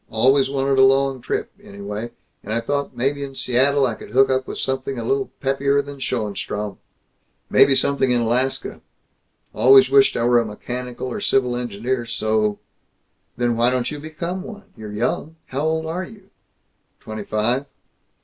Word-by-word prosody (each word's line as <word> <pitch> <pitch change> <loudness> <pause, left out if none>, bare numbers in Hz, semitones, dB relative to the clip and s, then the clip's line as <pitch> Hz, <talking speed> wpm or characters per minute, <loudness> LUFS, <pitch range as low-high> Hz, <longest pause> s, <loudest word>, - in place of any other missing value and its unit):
Always 130 +4 +3
wanted 135 0 +1
a - - +8
long 135 -1 +3
trip, - - -3
anyway, 105 +3 -6 0.3
and 105 - -7
I 115 - +1
thought 140 +1 -3
maybe 140 +3 0
in 135 -1 -7
Seattle 135 +3 +2
I 120 - 0
could - - -11
hook 135 +1 +4
up 130 0 0
with - - -6
something 135 0 -2
a 115 - -3
little 135 +2 0
peppier 140 +1 +1
than 140 0 -9
Schoenstrom. 105 -4 -3 0.7
Maybe 135 - +6
something 135 -1 +1
in 120 -1 +2
Alaska. 125 +3 -1 0.7
Always 130 0 +6
wished 135 -1 +5
I 115 - 0
were 120 0 +4
a 115 - 0
mechanical 125 +4 -6
or - - -4
civil 130 -10 +1
engineer 120 +1 -3
so 110 -2 0 0.4
" - - -47
"Then 120 -1 +1
why 120 +2 +3
don't 125 +1 -1
you 150 - -5
become 170 +4 -5
one? 205 0 -11
You're 105 -1 -8
young 145 +9 -2
How 135 +2 -4
old 160 0 0
are 170 +3 -3
you?" 200 -1 -13 0.7
"Twenty 110 -1 -7
five." 120 +7 0
130 Hz, 170 wpm, -21 LUFS, 115-140 Hz, 0.7 s, a